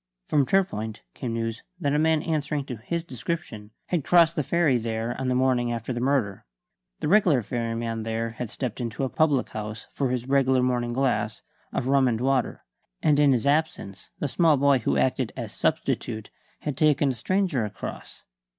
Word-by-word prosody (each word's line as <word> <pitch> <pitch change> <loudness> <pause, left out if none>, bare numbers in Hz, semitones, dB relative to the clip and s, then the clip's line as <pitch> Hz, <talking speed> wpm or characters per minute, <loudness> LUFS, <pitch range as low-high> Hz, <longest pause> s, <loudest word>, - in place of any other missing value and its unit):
From 140 -3 +2
Torpoint 110 - 0
came 120 -4 -4
news 115 -1 -3 0.2
that 145 -5 0
a 150 - +2
man 160 -1 +2
answering 150 -3 -1
to 125 -4 -6
his 165 +10 -3
description 125 -6 -5 0.2
had 170 -5 -1
crossed 170 0 +5
the 155 - +1
ferry 150 -3 +2
there 115 +1 -3
on 130 - -1
the 125 - +1
morning 125 -2 +2
after 115 +2 -3
the 120 - -3
murder. 125 -7 0 0.6
The - - -1
regular 170 - +4
ferryman 115 0 -3
there 115 +1 -2
had 115 0 -5
stepped 125 0 -4
into 115 +2 -3
a 130 - 0
public 145 -4 +2
house 105 0 -6
for 135 -3 0
his 125 0 -2
regular 130 -2 +3
morning 120 -1 0
glass 135 0 0 0.3
of 125 - -2
rum 135 -1 +4
and 115 -2 0
water; 130 0 0 0.4
and 150 -2 +4
in 145 -1 +5
his 125 -2 +1
absence 145 - -1
the 145 - -2
small 160 +1 +3
boy 140 -1 +4
who 70 - 0
acted 65 - +1
as - - -5
substitute 110 -1 -1 0.3
had 150 -3 -3
taken 145 -1 +3
a - - -2
stranger 180 - 0
across. 105 -1 -7
130 Hz, 185 wpm, -26 LUFS, 115-150 Hz, 0.6 s, crossed